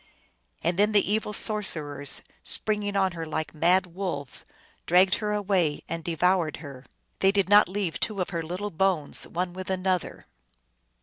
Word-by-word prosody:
And 170 +3 0
then 210 +1 +3
the 205 -1 +3
evil 215 0 0
sorcerers, 155 -10 0 0.2
springing 210 -1 -1
on 190 -1 +2
her 165 -1 -6
like 155 -1 -4
mad 175 +4 +3
wolves, 175 -7 -4 0.4
dragged 185 +2 +5
her 210 -2 -2
away 190 -7 0
and 165 0 -4
devoured 170 -1 +1
her. 140 -4 -11 0.3
They 195 - +4
did 200 -2 +1
not 205 -1 +6
leave 190 -4 -2
two 215 -3 -2
of 185 - -2
her 170 -2 -2
little 180 +6 -5
bones 175 -4 +1
one 175 +1 -3
with 185 +1 -7
an 190 0 -2
other. 185 -2 -1
185 Hz, 165 wpm, -26 LUFS, 165-200 Hz, 0.4 s, not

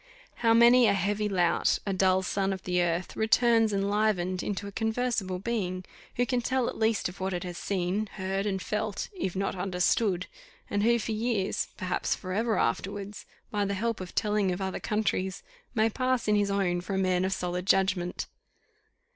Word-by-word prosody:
How 230 -1 +3
many 240 +1 +7
a 200 - +4
heavy 205 +2 0
lout, 175 -3 +2
a 195 - -1
dull 190 0 +3
son 195 +1 0
of 190 - -7
earth, 175 -1 0
returns 225 0 +3
enlivened 200 -2 +1
into 205 0 -3
a 200 - -6
conversable 220 -3 -1
being, 185 -3 -3 0.3
who 245 - +2
can 245 +1 0
tell 260 0 0
at - - -3
least 220 -1 +2
of 180 - -10
what 190 0 -2
it 175 - -3
has 175 -1 -6
seen, 195 +2 -1
heard, 195 +1 -2
and 190 -2 -1
felt, - - -3
if 265 - -3
not 195 0 -1
understood; 180 +1 +1 0.5
and 205 - +1
who 235 +2 +4
for 225 0 -3
years, 215 -3 -1
perhaps 185 -2 -1
for 185 0 -6
ever 220 +2 +1
afterwards, 200 - -2 0.2
by 205 -1 0
the 200 0 -1
help 230 +1 -2
of 180 - -8
telling 210 -3 +1
of 180 - -3
other 190 -1 -3
countries, 195 -3 -1 0.3
may 220 0 +4
pass 255 +1 0
in 210 - +3
his 205 -1 +2
own 185 -3 0
for 190 +2 -4
a - - 0
man 185 -1 +2
of 190 - 0
solid 180 0 -3
judgment! 190 -2 +1
195 Hz, 185 wpm, -28 LUFS, 185-220 Hz, 0.5 s, many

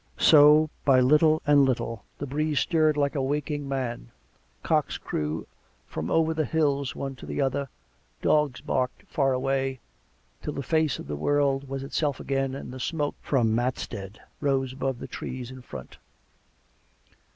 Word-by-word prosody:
So, 150 0 +7
by 135 -2 +5
little 150 +4 +4
and 145 -1 +6
little, 115 -4 -1
the 145 - -4
breeze 150 +2 0
stirred 155 -3 +2
like 140 -1 +1
a 140 - -1
waking 145 +1 -2
man; 120 - -3 0.5
cocks - - +1
crew 75 +1 -3 0.4
from 80 +2 -5
over 160 +5 +2
the 160 0 0
hills 140 -4 0
one 135 -1 -4
to - - -10
the - - -4
other; 135 0 0 0.5
dogs 150 -4 +2
barked 130 -4 -1
far 135 -4 0
away, 135 0 0 0.6
till 150 - -4
the 140 - -4
face 160 0 +1
of - - -8
the 75 - -4
world 140 - +1
was 135 0 -4
itself 145 0 -1
again, 135 -1 -1
and 135 - -7
the 130 - -7
smoke 145 +2 -1
from 120 -6 +1
Matstead 110 -4 -3 0.2
rose 135 -3 0
above 135 -1 -2
the - - -7
trees 125 -1 -6
in 130 0 -10
front. 65 - -10
135 Hz, 160 wpm, -26 LUFS, 130-150 Hz, 0.6 s, So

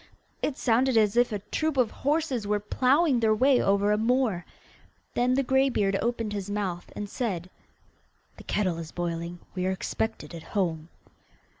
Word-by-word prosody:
It 280 - -1
sounded 250 +1 +2
as 210 -1 +3
if 245 0 +3
a 210 - -1
troop 315 -3 0
of 250 -4 +3
horses 285 -6 -1
were 210 0 +1
ploughing 260 +6 +2
their 220 -1 +3
way 260 +3 +4
over 200 +1 +2
a 210 - +2
moor. 230 -6 +1 0.7
Then 250 +1 +2
the 275 - +2
greybeard 260 -7 +2
opened 230 -3 -1
his 200 -1 -4
mouth, 195 -4 -3
and 205 - -4
said: 190 -5 -3 0.9
'The - - -13
kettle 185 -5 0
is 160 -2 -7
boiling; 170 0 -4 0.2
we 185 0 -1
are - - +1
expected 220 +2 -3
at 165 - -7 0.2
home. 165 -4 -1
215 Hz, 165 wpm, -27 LUFS, 190-255 Hz, 0.9 s, way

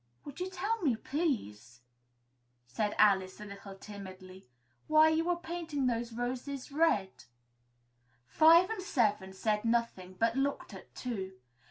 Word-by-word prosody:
"Would 285 +2 -9
you 365 +1 -3
tell 405 +5 -2
me, 275 -9 +2
please," 125 - -3 0.8
said 205 - -2
Alice, 190 -3 +3
a 210 - -8
little 200 -1 -10
timidly, 190 -4 -11 0.4
"why 310 0 +6
you 325 +2 +1
are 355 - +3
painting 330 -5 -3
those 235 -1 -1
roses?" 255 +4 -4 1.5
Five 330 - +6
and 445 - -3
Seven 210 - 0
said 210 +2 -1
nothing, 230 -6 -1
but 230 +5 +1
looked 275 +1 -2
at - - -13
Two. 195 -7 -4
235 Hz, 130 wpm, -32 LUFS, 195-310 Hz, 1.5 s, why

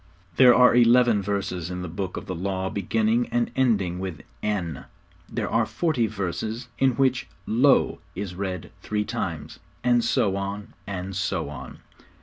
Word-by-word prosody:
There 125 -2 +8
are 125 0 +7
eleven 120 -2 +5
verses 95 -3 -2
in 90 0 -4
the - - -4
Book 90 +2 -4
of - - -6
the 95 - -4
Law 95 +1 -2
beginning 110 +4 +1
and 120 0 0
ending 100 -9 +1
with 90 -5 -5 0.2
'N,' 90 -9 -2 0.5
there - - -2
are - - +1
forty 150 -10 0
verses 110 +6 -4
in 135 -1 +4
which 130 +1 +1 0.2
'Lo' 130 +5 +3 0.2
is 95 -1 -4
read 95 -2 -4
three 105 0 -1
times - - -4 0.2
and 120 -1 +3
so 100 -4 +2
on, 100 +2 -5
and 95 -1 -4
so 95 -5 -1
on. 70 -3 -9
100 Hz, 155 wpm, -25 LUFS, 95-120 Hz, 0.5 s, There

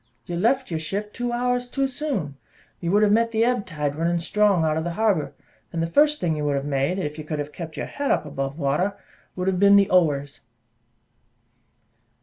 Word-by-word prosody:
"You 175 - -4
left 245 +6 +1
your 160 - -1
ship 200 +7 -4
two 245 -1 -3
hours 245 +1 0
too 270 +2 0
soon: 255 - -3 0.4
you 170 - -3
would 205 +3 +4
have 205 - +4
met 230 +2 +3
the 225 0 +1
ebb 245 -4 0
tide 150 -4 -2
running 170 +2 0
strong 195 0 +2
out 155 -1 +1
of 160 - -1
the 170 0 -3
harbour; 170 -10 0 0.4
and 165 - -3
the 165 - +1
first 295 - +3
thing 165 -3 0
you 150 - -3
would 145 -1 +1
have 140 0 -2
made, 140 +5 0
if 150 -4 -4
you - - -5
could 155 0 -4
have 145 0 -5
kept 165 -3 -7
up - - -13
your - - -2
head 285 -1 -3
above 135 -1 -1
water, 170 +7 0 0.4
would 185 0 -3
have 185 -2 +1
been 200 +1 +6
the 200 0 +4
Ower's." 145 -6 +2
180 Hz, 215 wpm, -24 LUFS, 155-220 Hz, 0.4 s, been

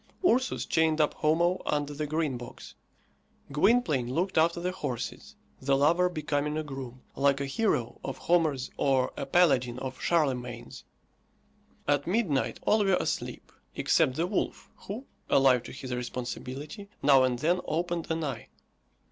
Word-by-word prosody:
Ursus 255 -2 +1
chained 160 -1 +2
up 150 - +3
Homo 170 +4 +2
under 145 0 -1
the 150 +1 -3
Green 155 -3 -1
Box; 120 -1 -9 0.8
Gwynplaine 150 - +2
looked 185 +3 0
after 165 +2 +3
the 180 +1 -1
horses, 130 -10 -5 0.3
the 135 +1 +2
lover 170 +6 +3
becoming 150 -2 -2
a 155 - -1
groom, 135 -3 -8
like 140 0 +2
a 140 - -1
hero 135 - -1
of 135 -1 -4
Homer's 155 -7 +1
or 135 -2 +2
a 135 - -4
paladin 135 -7 +3
of 130 0 -6
Charlemagne's. 125 -8 -1 1.0
At 145 0 +1
midnight, 180 - 0
all 215 -1 +4
were 195 -2 +3
asleep, - - -3 0.2
except 130 - +2
the 165 - +1
wolf, 190 +2 -3 0.2
who, 225 +7 -5 0.2
alive 130 -3 +5
to - - -8
his 130 -1 -6
responsibility, 130 +8 -5
now 140 -2 +6
and 130 -1 +2
then 170 +7 +1
opened 170 +1 -2
an 160 0 -1
eye. 135 -7 -4
150 Hz, 150 wpm, -29 LUFS, 130-170 Hz, 1.0 s, now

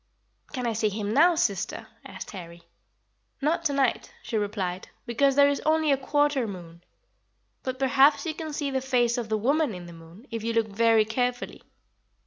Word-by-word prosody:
"Can 255 -4 -4
I 230 - 0
see 215 0 +1
him 205 +1 -3
now, 335 +6 +5
sister?" 200 - -1 0.2
asked - - -9
Harry. 170 -3 -10 0.8
"Not 315 +4 0
to 285 - +1
night," 275 - 0
she 230 - -5
replied, 200 -4 -2 0.2
"because 270 +3 +2
there 285 0 +6
is 285 0 0
only 315 -1 +2
a - - +5
quarter 290 -2 +1
moon. 170 -3 -10 0.8
But 260 -1 -4
perhaps 275 +4 +4
you 320 - -2
can 310 0 -6
see 290 -1 -3
the 265 -1 -1
face 245 -2 +1
of 230 -2 -5
the 220 - +1
woman 275 +1 +1
in 180 -1 -9
the 170 - -11
moon, 165 +7 -15
if 230 -1 -4
you 230 0 -1
look 225 -1 +1
very 225 +1 +3
carefully. 245 +3 -2
240 Hz, 185 wpm, -26 LUFS, 210-280 Hz, 0.8 s, there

